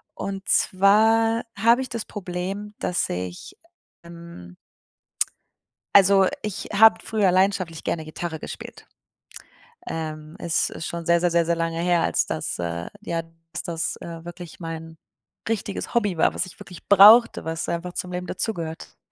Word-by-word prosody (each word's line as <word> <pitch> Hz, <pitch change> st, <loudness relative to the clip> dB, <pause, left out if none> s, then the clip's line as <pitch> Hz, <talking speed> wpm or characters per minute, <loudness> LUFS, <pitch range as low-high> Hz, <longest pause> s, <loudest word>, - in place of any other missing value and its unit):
Und 195 Hz, 0 st, -5 dB
zwar 225 Hz, +4 st, +4 dB
habe 230 Hz, +5 st, +4 dB
ich 255 Hz, -, -5 dB
das 230 Hz, -2 st, -4 dB
Problem, 195 Hz, +2 st, -5 dB
dass 180 Hz, -, -1 dB
ich, 90 Hz, 0 st, -6 dB, 0.5 s
ähm 170 Hz, -, -12 dB, 1.4 s
also, 195 Hz, -1 st, +6 dB
ich 210 Hz, -3 st, -5 dB
habe 220 Hz, +2 st, +7 dB
früher 210 Hz, -4 st, +2 dB
leidenschaftlich 185 Hz, -3 st, +1 dB
gerne 160 Hz, -2 st, -2 dB
Gitarre 160 Hz, +1 st, -5 dB
gespielt. -, -, -9 dB, 1.0 s
Ähm, 155 Hz, -1 st, -5 dB
es 170 Hz, -1 st, 0 dB
ist 160 Hz, -, -6 dB
schon 170 Hz, -1 st, -5 dB
sehr, 170 Hz, +1 st, +4 dB
sehr, 175 Hz, +1 st, +2 dB
sehr, 170 Hz, 0 st, +3 dB
sehr 170 Hz, +1 st, +1 dB
lange 165 Hz, 0 st, -2 dB
her, 175 Hz, 0 st, +2 dB
als -, -, +1 dB
das -, -, -4 dB
äh, 85 Hz, 0 st, -3 dB
ja, 170 Hz, -, -3 dB, 0.4 s
als 175 Hz, -, -4 dB
das, 165 Hz, -1 st, -3 dB
äh, 165 Hz, 0 st, -9 dB
wirklich 175 Hz, 0 st, -9 dB
mein 165 Hz, -1 st, -7 dB, 0.5 s
richtiges 210 Hz, -3 st, -3 dB
Hobby 205 Hz, -7 st, +1 dB
war, -, -, +3 dB
was 185 Hz, -, -2 dB
ich -, -, -14 dB
wirklich 180 Hz, -, -12 dB
brauchte, 210 Hz, +1 st, +7 dB
was 165 Hz, 0 st, -3 dB
einfach 175 Hz, +1 st, -3 dB
zum 180 Hz, -, -4 dB
Leben 180 Hz, 0 st, -4 dB
dazugehört. 165 Hz, -7 st, -4 dB
175 Hz, 150 wpm, -24 LUFS, 165-200 Hz, 1.4 s, habe